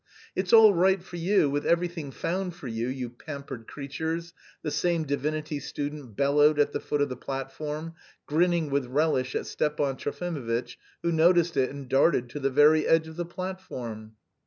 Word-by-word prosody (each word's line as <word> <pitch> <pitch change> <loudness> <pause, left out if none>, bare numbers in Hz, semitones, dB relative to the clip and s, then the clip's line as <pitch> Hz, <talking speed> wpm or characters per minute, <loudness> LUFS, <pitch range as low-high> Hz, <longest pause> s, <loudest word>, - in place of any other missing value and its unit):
"It's 185 -1 -1
all 220 -2 +9
right 190 +2 +3
for 175 -2 -8
you, 175 -1 +3
with 145 +1 -1
everything 170 -3 0
found 180 +6 -3
for 160 -6 -8
you, 115 0 -2
you 130 -1 -3
pampered 135 -1 -8
creatures!" 160 +4 -4 0.3
the 150 - -2
same 170 -1 +1
divinity 150 +1 -2
student 145 -4 -6
bellowed 145 +3 +4
at 145 -1 +2
the - - -1
foot 145 -1 -1
of 145 - -2
the 125 - -4
platform, 150 +5 -5 0.3
grinning 165 -1 +1
with 140 -2 0
relish 130 -2 +1
at - - -1
Stepan 145 -3 -1
Trofimovitch, 140 -7 -3 0.3
who 170 - +1
noticed 170 0 +4
it 130 -2 +2
and 140 -1 -8
darted 135 -1 +3
to 145 - -6
the 135 -1 +1
very 150 +3 +5
edge 165 -1 +3
of 160 - -10
the 175 +1 -3
platform. 150 - -6
150 Hz, 175 wpm, -27 LUFS, 135-170 Hz, 0.3 s, all